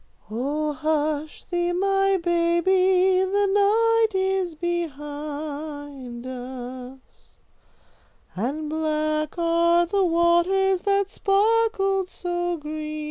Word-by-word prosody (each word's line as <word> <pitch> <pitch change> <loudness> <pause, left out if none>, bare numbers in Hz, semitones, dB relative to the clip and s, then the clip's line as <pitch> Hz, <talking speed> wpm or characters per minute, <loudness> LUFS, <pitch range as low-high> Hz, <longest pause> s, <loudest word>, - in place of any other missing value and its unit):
"'Oh, 295 +6 -2
hush 305 0 -2
thee 350 -1 -1
my 390 +1 +2
baby, 365 +2 +3
the 400 +2 +1
night 445 +1 +3
is 380 -3 0
behind 290 -5 -5
us, 255 0 -7 1.4
And 275 +10 -3
black 310 0 -1
are 340 0 +3
the 390 +3 +1
waters 350 +2 +2
that 400 0 +1
sparkled 395 -2 +1
so 350 -1 -3
green.'" 305 0 -5
340 Hz, 85 wpm, -24 LUFS, 300-380 Hz, 1.4 s, baby